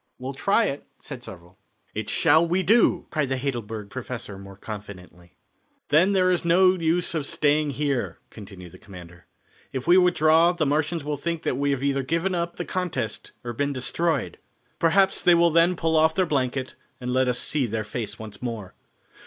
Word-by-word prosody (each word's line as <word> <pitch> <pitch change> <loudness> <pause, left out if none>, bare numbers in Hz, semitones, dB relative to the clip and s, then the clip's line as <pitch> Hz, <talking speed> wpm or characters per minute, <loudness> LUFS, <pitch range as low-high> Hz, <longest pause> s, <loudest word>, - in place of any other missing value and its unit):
"We'll 130 +2 -6
try 200 +11 +2
it," 140 -6 -3 0.2
said 130 -4 -9
several. 90 -3 -12 0.3
"It - - -4
shall 165 +2 +4
we 180 +3 +1
do," 205 -2 +3
cried 150 -5 -1
the 135 - -1
Heidelberg 115 -6 -4
professor 105 -4 -6
more 100 0 -11
confidently. 95 -5 -10 0.5
"Then 175 +7 +4
there 185 -1 +3
is 175 - 0
no 185 +2 +5
use 170 -1 0
of 160 -3 -1
staying 150 0 +1
here," 140 -4 -1
continued 95 -4 -11
the - - -15
commander. 90 -3 -13 0.4
"If 130 -1 -4
we 180 +2 +6
withdraw 165 -1 +4
the 170 -3 -1
Martians 155 +3 0
will 145 0 -3
think 170 +3 -3
that - - 0
we 140 +2 0
have 135 -1 -1
either 140 -1 +1
given 165 +7 -1
up 170 -1 -2
the 175 - -5
contest 180 -11 -4
or 120 -1 -5
been 140 +4 -1
destroyed. 165 +6 -1 0.4
Perhaps 190 +4 +3
they 175 - +5
will 170 0 +4
then 170 +3 +4
pull 165 -1 0
off 160 0 +3
their 185 - +2
blanket 130 -4 -2 0.3
and 125 -1 -4
let 130 0 +2
us 125 -1 0
see 140 -2 -1
their 110 0 -3
face 110 +1 -5
once 105 -2 -9
more. 115 -6 -5
145 Hz, 185 wpm, -24 LUFS, 120-170 Hz, 0.5 s, we